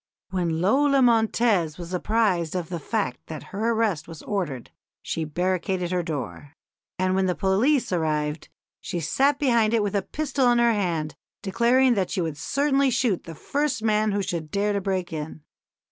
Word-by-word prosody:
When 170 -3 -1
Lola 275 +7 +3
Montez 220 -8 +2
was 175 +1 -7
apprised 185 -4 +1
of 175 -3 -3
the 175 -2 -4
fact 125 -4 -2
that 155 -2 -7
her 220 +4 0
arrest 220 -8 0
was 165 -2 -10
ordered 160 - -3 0.3
she 160 - -3
barricaded 180 +2 -1
her 180 -1 +1
door; 145 - -6 0.4
and 185 0 +1
when 190 0 +2
the 180 - 0
police 230 +9 +2
arrived 155 -3 -1 0.3
she 175 - -4
sat 270 - +2
behind 235 -5 +2
it 220 - +2
with 205 - -2
a 200 - +2
pistol 270 +2 0
in 240 - +3
her 235 -1 +4
hand, 170 -7 -1 0.3
declaring 240 +6 +3
that 195 -5 0
she - - -2
would 160 -4 -2
certainly 275 - +1
shoot 235 -6 0
the 165 - -8
first 280 - -2
man 215 -1 +2
who 200 0 0
should 165 -4 -4
dare 205 +4 0
to 200 - -1
break 185 -3 -2
in." 155 0 -6
190 Hz, 175 wpm, -25 LUFS, 165-230 Hz, 0.4 s, her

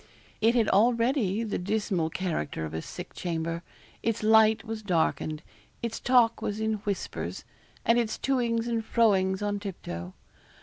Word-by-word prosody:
It 230 +2 +4
had 230 -3 +3
already 230 -1 +3
the 215 - -2
dismal 195 -3 0
character 160 - -2
of 80 - -7
a 80 - -3
sick - - -8
chamber. 165 -1 -3 0.4
Its 230 -1 -1
light 220 0 +5
was 225 -1 -5
darkened; 160 -5 0 0.4
its 235 -1 -3
talk 245 -2 +4
was 205 +1 -2
in 220 0 0
whispers; 200 -2 -3 0.4
and 235 +1 +4
its 225 -2 -1
to 270 -2 +1
ings 230 -1 0
and 230 -1 -1
fro 225 -1 +4
ings 190 +1 0
on 205 0 -1
tip 200 -3 -6
toe. 85 +2 -6
215 Hz, 165 wpm, -28 LUFS, 180-230 Hz, 0.4 s, light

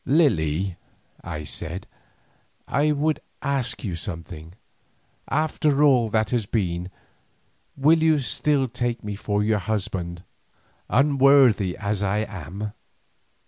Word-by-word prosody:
"Lily," 95 - +2 0.5
I 75 -3 -5
said, 85 +5 -6 0.8
"I 150 +2 +2
would 150 +1 +1 0.2
ask 135 -4 -2
you 95 -6 -3
something. 85 0 -7 0.8
After 150 -2 +1
all 125 -6 +4
that 110 0 0
has 115 -5 0
been, 90 -5 -1 0.9
will 155 +4 +4
you 160 -1 +4
still 140 0 +1
take 120 -1 -3
me 105 -1 -4
for 105 0 -1
your 105 0 +2
husband, 90 -3 -3 0.7
unworthy 135 -7 +4
as 105 -1 -2
I 105 +2 +1
am?" 100 +3 -6
110 Hz, 110 wpm, -24 LUFS, 90-140 Hz, 0.9 s, all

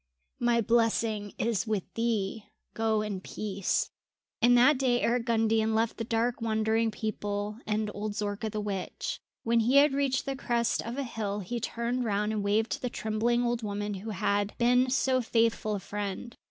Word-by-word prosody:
My 240 -1 +3
blessing 225 -2 +1
is 230 -1 0
with 210 -4 0
thee. 225 -2 -1 0.3
Go 220 -1 +1
in 200 -3 -4
peace." 200 -1 -2 0.5
And 245 +1 +6
that 255 +3 +5
day 250 -2 +2
Eric 235 0 +1
Gundian 225 -1 +2
left 225 +1 +1
the 230 - -2
dark 230 +2 0
wandering 220 0 +1
people 210 -1 -3
and 215 0 0
old 210 +1 -3
Zorka 210 0 -2
the 215 - -3
witch. 200 -3 -4 0.2
When 230 0 +3
he 235 +4 +2
had 285 0 +6
reached 275 -2 +1
the 275 - -2
crest 235 -3 0
of 235 +3 -5
a 280 - -1
hill 210 -4 -3
he 235 +6 -4
turned 235 +2 -2
round 210 -1 0
and 210 -2 -1
waved 215 +3 +1
to - - -2
the 250 - -1
trembling 230 +2 0
old 240 0 0
woman 205 -1 -3
who 200 +3 -6
had 205 0 0
been 250 +2 +4
so 260 0 +2
faithful 225 -2 +1
a - - -3
friend. 205 +4 -5
225 Hz, 180 wpm, -29 LUFS, 210-240 Hz, 0.5 s, And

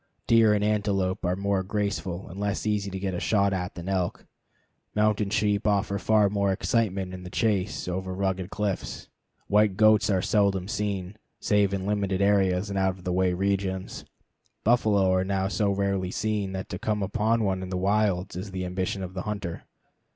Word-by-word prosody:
Deer 115 -2 +5
and 105 - 0
antelope 100 -3 0
are 90 0 +1
more 100 0 0
graceful 95 -2 -3
and 90 +3 -9
less 100 0 -2
easy 105 -2 0
to 95 - -5
get 95 -1 -2
a 90 - -2
shot 100 -2 +2
at 90 0 -3
than 85 0 -7
elk. 95 -2 -1 0.7
Mountain 105 -1 +2
sheep 105 0 +1
offer 100 -1 +1
far 110 -2 +3
more 100 -1 +1
excitement 95 -2 0
in 90 - -7
the 90 - -8
chase 100 -2 0
over 95 +1 -3
rugged 95 -1 -2
cliffs. 100 -2 -3 0.4
White 105 -2 +3
goats 110 +1 +5
are 95 -2 +2
seldom 100 -3 +2
seen, 100 -2 -3 0.2
save 105 -2 +2
in 95 -1 -2
limited 100 -2 0
areas 100 -1 +2
and 100 - -1
out 95 -1 +1
of 90 - -15
the 90 -1 -1
way 90 0 +2
regions. 95 0 -2 0.6
Buffalo 105 -5 +3
are 95 0 +2
now 95 0 0
so 100 +1 0
rarely 100 -2 0
seen 105 -1 -1
that 95 0 -4
to 90 - -5
come 105 -2 -1
upon 110 +3 +1
one 95 -2 0
in 95 - -6
the 90 - -2
wilds 100 -1 +1
is 95 +3 -5
the 95 -1 -4
ambition 95 +1 -2
of 90 0 -6
the 95 - -4
hunter. 95 -4 -5
100 Hz, 190 wpm, -26 LUFS, 95-105 Hz, 0.7 s, Deer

